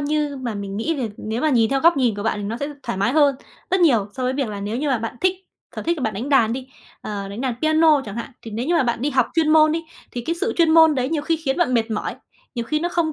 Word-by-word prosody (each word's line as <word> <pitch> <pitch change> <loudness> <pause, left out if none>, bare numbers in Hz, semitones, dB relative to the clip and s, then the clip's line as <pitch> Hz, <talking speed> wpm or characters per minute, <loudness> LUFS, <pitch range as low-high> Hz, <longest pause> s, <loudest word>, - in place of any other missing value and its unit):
như 295 -1 -1
mà 240 -4 -4
mình 200 -1 -5
nghĩ 310 +10 -1
về 260 -6 -2
nếu 220 +2 -4
mà 310 - +2
nhìn 230 -4 +3
theo 275 -1 +1
góc 335 0 +5
nhìn 245 -5 +2
của 205 - -4
bạn 205 -2 -2
nó 230 - -3
sẽ 285 +3 -3
thoải 235 -6 -4
mái 230 +6 +1
hơn 290 -3 +4 0.4
rất 375 0 +2
nhiều, 235 - +4
so 260 - -3
với 255 - +1
việc 265 -3 -2
là 205 -1 -5
nếu 210 +3 -3
như 290 +4 -1
mà 260 -4 +1
bạn 225 +2 -5
thích 370 0 +3 0.4
sở - - -4
thích 340 +1 0
là - - -4
bạn 220 -4 -1
đánh 235 +8 -4
đàn 235 -6 +4
đi, 260 +1 -5 0.3
ờ, 200 -2 -5
đánh 200 +4 -7
đàn 255 -3 -1
piano 315 -2 +4
chẳng 205 +1 -7
hạn, 235 - -5
thì 225 - -8
nếu 230 +5 -3
như 345 - +1
mà 330 - +4
bạn 235 -2 -1
đi 290 - 0
học 255 -3 +2
chuyên 320 -2 +2
môn 310 0 +5
đi, 330 0 -2 0.3
thì 245 - -4
cái 335 - 0
sự 420 +4 0
chuyên 330 -2 +4
môn 320 -1 +6
đấy, 255 -1 -1
nhiều 305 -1 -1
khi 325 +1 0
khiến 280 -4 -2
bạn 330 -8 +1
mệt 225 -1 +1
mỏi, 215 - -3 0.4
nhiều 235 - -3
khi 305 +6 -1
nó 345 - -1
không 335 -3 0
265 Hz, 310 wpm, -21 LUFS, 225-310 Hz, 0.4 s, môn